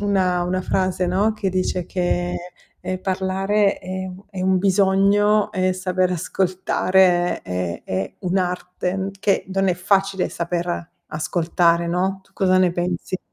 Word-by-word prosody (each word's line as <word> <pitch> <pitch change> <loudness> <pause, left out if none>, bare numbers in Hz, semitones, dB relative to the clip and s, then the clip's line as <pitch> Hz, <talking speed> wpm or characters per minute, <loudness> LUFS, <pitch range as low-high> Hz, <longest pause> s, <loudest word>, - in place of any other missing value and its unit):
una 185 -3 +1
una 185 +1 -1
frase, 185 -1 0
no, 200 +5 +2
che 195 -3 -2
dice 185 -1 -1
che, 175 -1 -1 0.5
ehm, 185 0 -3
parlare 195 +2 +1
è 185 0 -5
un 185 +1 -9
è 190 -3 -6
un 190 0 +2
bisogno 200 +2 +3
e 185 -2 +1
saper 185 0 0
ascoltare 185 0 +1
è 90 -1 -4
è 95 0 -3
un'arte, 180 +1 -2
che 200 -1 +1
non 195 0 +1
è 180 - +2
facile 195 +1 +1
saper 175 0 -3 0.2
ascoltare, 170 +1 +1
no, 185 +3 -1
tu 190 - -30
cosa 185 -1 +2
ne 180 -2 +3
pensi? 175 +1 -2
185 Hz, 140 wpm, -22 LUFS, 180-195 Hz, 0.5 s, bisogno